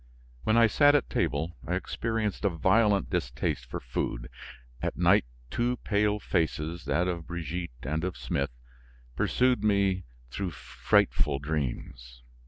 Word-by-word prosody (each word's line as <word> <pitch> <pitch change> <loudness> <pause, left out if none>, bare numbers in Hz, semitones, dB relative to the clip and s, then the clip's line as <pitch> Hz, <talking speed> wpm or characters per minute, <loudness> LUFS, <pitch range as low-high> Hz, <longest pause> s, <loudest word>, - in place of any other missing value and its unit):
When 110 - +3
I 115 - +7
sat 145 +6 +5
at 145 - +1
table, 80 +4 0
I - - 0
experienced 110 -3 -2
a 100 - +4
violent 100 +4 +3
distaste 80 -10 -2
for - - -5
food; - - -3 0.5
at - - -2
night - - +4 0.3
two 120 +1 0
pale 105 0 +1
faces, 85 -3 -1
that 90 +2 +1
of 85 -3 -3
Brigitte 85 +1 -4
and 80 +2 -2
of 90 -1 -3
Smith, 70 0 -1 0.7
pursued 125 -2 +2
me 100 -3 +2 0.3
through 95 +5 -2
frightful 70 0 +1
dreams. 60 -4 -4
90 Hz, 135 wpm, -28 LUFS, 75-105 Hz, 0.7 s, I